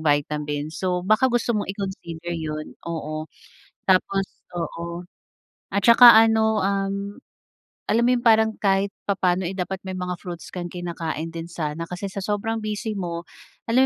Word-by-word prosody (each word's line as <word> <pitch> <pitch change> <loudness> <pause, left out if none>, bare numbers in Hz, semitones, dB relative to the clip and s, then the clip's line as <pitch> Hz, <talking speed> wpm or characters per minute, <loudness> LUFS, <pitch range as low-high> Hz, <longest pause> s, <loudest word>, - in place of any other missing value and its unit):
vitamin. 150 0 0
So 180 0 -1
baka 215 +6 +4
gusto 240 -1 +1
mong 210 -3 -1
i-consider 175 -4 -5
yun 155 -2 -4 0.2
oo. 155 -1 -4 0.6
Tapos 195 +1 +3 0.3
oo. 170 +1 -5 0.6
At 200 -1 0
saka 235 0 +10
ano 220 -1 +4
um, 195 0 0 0.9
alam 230 +2 +3
mo - - +4
yun 240 - -6
parang 220 -1 +4
kahit 195 0 +2 0.2
papaano, 185 -2 +1
eh, 190 - -3
dapat 190 +1 -2
may 190 - -4
mga 180 -1 -3
fruits 175 -3 -7
kang 175 -1 -4
kinakain 165 -2 -4
din 165 0 -6
sana 165 -1 -3
kasi 180 +3 -4
sa - - -11
sobrang 215 +3 -1
busy 215 +1 -3
mo, 170 -2 -3 0.5
alam 260 +3 +5
185 Hz, 150 wpm, -24 LUFS, 170-210 Hz, 0.9 s, saka